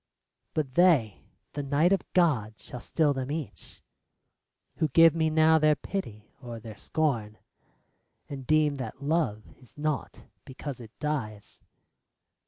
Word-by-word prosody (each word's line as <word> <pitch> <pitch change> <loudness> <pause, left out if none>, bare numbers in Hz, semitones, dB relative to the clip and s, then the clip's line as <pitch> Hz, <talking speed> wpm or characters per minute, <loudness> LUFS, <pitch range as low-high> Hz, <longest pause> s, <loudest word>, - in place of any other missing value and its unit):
But 145 -5 -1
they 145 - +3 0.2
— - - -49
the 145 - -3
night 145 +6 +2
of 195 - -2
God 125 - +2
shall 125 - -8
still 150 +4 +1
them 135 -1 -4
each 145 - -7 0.9
Who 160 - +2
give 165 +3 +6
me 160 -1 +1
now 160 0 +4
their 155 0 +4
pity 110 - -6
or 120 -3 -7
their 110 -1 -10
scorn, 115 -8 -1 0.9
And 135 -3 -8
deem 155 -2 +3
that 130 +1 -7
love 145 -9 0 0.2
is 125 -1 -21
naught 150 -1 -3 0.2
because 135 0 -7
it 115 -3 -10
dies. 115 -9 -4
145 Hz, 140 wpm, -28 LUFS, 115-155 Hz, 0.9 s, give